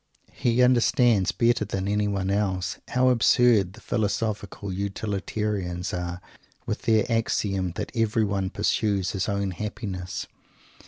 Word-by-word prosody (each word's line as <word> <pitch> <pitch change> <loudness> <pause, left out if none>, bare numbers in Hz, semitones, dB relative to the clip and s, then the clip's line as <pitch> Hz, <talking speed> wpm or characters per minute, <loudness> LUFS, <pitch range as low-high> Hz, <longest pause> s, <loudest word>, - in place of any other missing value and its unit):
He 120 +1 +2
understands, 120 -4 +4
better 120 -1 +2
than 95 -2 -3
anyone 100 -2 0
else, 95 -3 -1
how 130 +1 +3
absurd 120 -5 +4
the - - -14
philosophical 100 -2 -2
utilitarians 100 -2 -3
are 90 0 -3 0.5
with - - -3
their 110 -1 +4
axiom 100 -5 0
that - - -5
everyone 105 -4 0
pursueshis 100 -1 0
own 100 -1 -1
happiness. 95 -1 -5
100 Hz, 110 wpm, -25 LUFS, 95-115 Hz, 0.5 s, understands